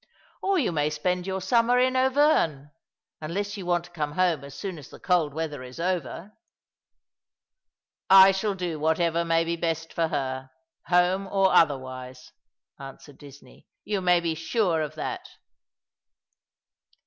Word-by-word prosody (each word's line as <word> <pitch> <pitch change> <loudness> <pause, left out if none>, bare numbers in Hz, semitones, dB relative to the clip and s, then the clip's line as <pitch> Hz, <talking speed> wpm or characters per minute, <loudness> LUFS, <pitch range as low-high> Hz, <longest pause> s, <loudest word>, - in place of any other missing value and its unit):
" - - -33
Or 390 0 +1
you 265 - +1
may 150 -2 0
spend 180 +4 -2
your 190 0 -3
summer 230 +5 +2
in 255 +1 +2
Auvergne 260 - +2 0.3
— - - -62
unless 200 +6 -4
you 190 -4 -7
want 175 -1 +1
to 175 - -15
come 150 -4 -4
homo 175 -4 0
as 140 - -12
soon 185 -2 -6
as 140 - -13
the - - -13
cold 175 -5 +1
weather 150 -2 -5
is 130 +4 -11
over." 180 +3 -3 0.9
" - - -66 0.2
I 195 - +5
shall 195 +1 -2
do 175 -4 -4
whatever 165 +2 +1
may 165 0 +2
be 170 0 -3
best 165 -1 -3
for 165 -1 0
her 130 -3 -4 0.2
— - - -52
home 180 +2 +2
or 190 -1 +2
other 145 -4 +4
wise," 130 -1 -10 0.5
answered 135 +1 -12
Disney. 145 -1 -16
" - - -59
You 205 -2 -2
may 180 -1 +3
be 165 -1 -1
sure 165 +1 0
of 155 0 -5
that.' 155 - -5
170 Hz, 170 wpm, -26 LUFS, 150-190 Hz, 0.9 s, I